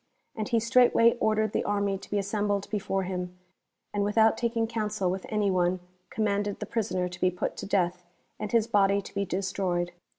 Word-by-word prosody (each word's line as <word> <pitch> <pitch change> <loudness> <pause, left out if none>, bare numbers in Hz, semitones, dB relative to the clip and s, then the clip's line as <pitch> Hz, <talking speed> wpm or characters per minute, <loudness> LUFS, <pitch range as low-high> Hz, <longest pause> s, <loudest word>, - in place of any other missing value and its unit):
And 215 -2 -3
he 230 - +3
straightway 230 0 +4
ordered 215 -1 +1
the - - 0
army 200 -1 0
to - - -13
be 205 - 0
assembled 205 0 -1
before 195 -2 -1
him, 180 -1 -4 0.6
and 205 -1 0
without 220 +2 +4
taking 230 -1 0
counsel 215 -4 -1
with 190 0 -5
any 210 -2 +1
one, 180 0 +1 0.3
commanded 205 -1 -1
the - - -4
prisoner 185 -5 -1
to 180 - -10
be 185 - +4
put 180 - -3
to - - -5
death, 180 -2 0 0.4
and 210 - -4
his 230 -2 +3
body 200 -3 +3
to - - -11
be 200 0 -1
destroyed. 180 -1 -1
200 Hz, 190 wpm, -28 LUFS, 185-215 Hz, 0.6 s, straightway